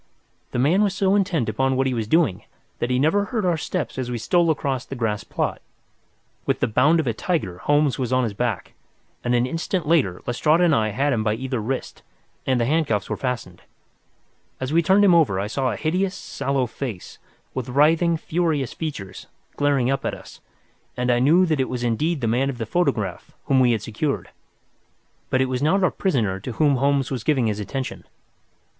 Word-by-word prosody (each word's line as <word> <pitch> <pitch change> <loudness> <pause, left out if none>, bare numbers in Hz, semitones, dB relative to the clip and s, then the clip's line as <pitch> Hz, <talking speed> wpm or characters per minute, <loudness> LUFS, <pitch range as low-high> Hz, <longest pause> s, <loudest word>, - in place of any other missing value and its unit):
The - - -4
man 155 +11 +3
was 200 -2 +1
so 195 -1 +2
intent 185 - +1
upon 130 +5 0
what 135 +1 +1
he 130 - 0
was 115 -3 -2
doing 155 - +2 0.4
that 120 - -1
he 125 - +1
never 160 +9 +2
heard 220 -3 -2
our 175 -2 +2
steps 155 -5 -3
as 125 -1 -3
we 120 - -2
stole 170 +9 +2
across 140 -5 -1
the - - -8
grass 110 -4 -1
plot. - - -3 0.9
With - - +1
the - - +2
bound 140 +9 +3
of 160 - 0
a 115 - 0
tiger 110 - -2
Holmes 145 +3 +2
was 125 -2 -2
on 130 0 +3
his 110 -4 -2
back, 115 -1 -3 0.5
and 120 0 +1
an 120 0 +2
instant 165 +5 -2
later 130 - +2
Lestrade 150 +7 +2
and 175 -3 +4
I 110 -3 +2
had 135 +7 0
him 110 -2 0
by 105 0 +1
either 130 +1 -3
wrist, 125 +5 -4 0.5
and 130 -2 +2
the 115 - +2
handcuffs 140 -6 0
had - - -1
been - - -23
fastened. 120 -9 -4 1.0
As 130 +3 -3
we 170 - +5
turned 195 +3 +4
him 185 - +6
over 145 - +3
I 100 - -1
saw 130 +5 -1
a - - -3
hideous, 185 +5 0
sallow 135 -2 -2
face, 115 -4 -7 0.3
with 130 -2 -4
writhing, 160 +5 +3
furious 155 -5 -1
features, 135 - -6 0.3
glaring 140 -3 +2
up 135 0 -1
at - - -2
us, - - -14 0.6
and 125 0 +1
I 120 - +3
knew 160 +9 +5
that 155 -4 0
it 130 - 0
was 125 -1 -3
indeed 140 +7 0
the 115 - 0
man 125 +5 +1
of 130 - -5
the 115 - -3
photograph 110 - -1
whom 135 - +3
we 125 -2 +4
had 110 -2 -2
secured. 135 +6 -3 1.0
But 130 - +2
it - - +3
was 130 0 -2
not 185 +6 +2
our 185 - +3
prisoner 115 - 0
to 120 +5 -6
whom 145 +2 +2
Holmes 140 0 +1
was 125 -5 -3
giving 130 -3 +2
his 105 -1 -1
attention. 130 +5 -5
130 Hz, 210 wpm, -23 LUFS, 120-160 Hz, 1.0 s, him